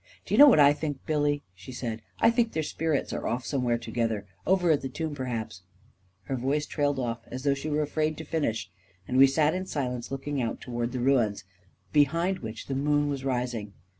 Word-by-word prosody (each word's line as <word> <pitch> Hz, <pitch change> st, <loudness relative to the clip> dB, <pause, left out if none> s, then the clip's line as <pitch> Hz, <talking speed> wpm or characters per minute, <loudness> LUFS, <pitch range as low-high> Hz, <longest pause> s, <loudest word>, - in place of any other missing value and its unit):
" -, -, -28 dB
Do -, -, -4 dB
you -, -, +4 dB
know 295 Hz, -, +11 dB
what 245 Hz, -, +6 dB
I 145 Hz, 0 st, +7 dB
think, 145 Hz, -2 st, -5 dB
Billy," 145 Hz, -2 st, +1 dB
she 95 Hz, +7 st, -11 dB
said. 115 Hz, -3 st, -4 dB
*' -, -, -34 dB
I -, -, +6 dB
think 235 Hz, -1 st, +1 dB
their 160 Hz, -, 0 dB
spirits 155 Hz, -1 st, -1 dB
are -, -, -3 dB
off 125 Hz, +2 st, -2 dB
somewhere 125 Hz, -4 st, 0 dB
together 115 Hz, -3 st, -2 dB
— -, -, -23 dB
over 180 Hz, -2 st, +3 dB
at 150 Hz, -, +2 dB
the 135 Hz, -, -4 dB
tomb, 160 Hz, +3 st, -4 dB
perhaps.. 115 Hz, -9 st, -4 dB, 0.3 s
." 95 Hz, 0 st, -40 dB
Her 135 Hz, -, -3 dB
voice 140 Hz, +4 st, 0 dB
trailed 145 Hz, -1 st, 0 dB
off 120 Hz, -3 st, -2 dB
as 130 Hz, +1 st, -6 dB
though 140 Hz, -1 st, +3 dB
she 140 Hz, +3 st, -4 dB
were 150 Hz, 0 st, +1 dB
afraid 155 Hz, +1 st, -1 dB
to 160 Hz, -, -6 dB
finish, 115 Hz, -, -2 dB, 0.4 s
and 130 Hz, -, -1 dB
we 135 Hz, -, +9 dB
sat 150 Hz, +3 st, +2 dB
in 185 Hz, +1 st, -3 dB
silence, 125 Hz, -6 st, -3 dB
looking 135 Hz, 0 st, -3 dB
out 115 Hz, -2 st, -2 dB
toward 120 Hz, -1 st, -3 dB
the 130 Hz, -, -3 dB
ruins, 120 Hz, -6 st, +2 dB, 0.5 s
behind 165 Hz, +6 st, +2 dB
which 110 Hz, -1 st, -7 dB
the 135 Hz, -, -4 dB
moon 145 Hz, +2 st, +1 dB
was 140 Hz, -2 st, -3 dB
rising. 120 Hz, -6 st, -2 dB
135 Hz, 225 wpm, -28 LUFS, 120-150 Hz, 0.5 s, know